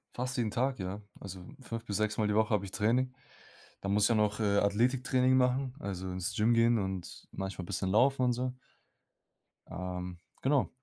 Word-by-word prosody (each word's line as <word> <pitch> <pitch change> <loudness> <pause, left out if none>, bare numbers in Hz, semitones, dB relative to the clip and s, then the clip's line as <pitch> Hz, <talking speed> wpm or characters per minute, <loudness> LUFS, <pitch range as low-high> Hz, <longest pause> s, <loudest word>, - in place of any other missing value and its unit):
Fast 125 +1 -2
jeden 110 -4 0
Tag, 130 +2 0
ja. 95 +3 -4 0.2
Also 95 -1 -7 0.2
5 115 -2 -6
bis 100 - -3
6 110 -1 0
Mal 105 -1 +2
die 105 - +1
Woche 110 0 +3
habe 100 -1 +1
ich 95 - -9
Training. 125 +5 +1 0.7
Da 100 - -4
muss 105 +1 +4
ja 115 - +3
noch 105 -1 +2
Athletiktraining 125 +5 +3
machen, 130 0 +2
also 95 -2 -4
ins 95 +2 -2
Gym 110 +2 +3
gehen 115 0 +4
und 95 -2 -5
manchmal 95 -1 -4
bisschen 95 +2 -2
laufen 130 +5 +4
und 125 -1 +3
so. 125 +1 -2 1.2
Ähm. 90 -1 -5 0.2
Genau. 135 0 +2
105 Hz, 175 wpm, -31 LUFS, 100-125 Hz, 1.2 s, muss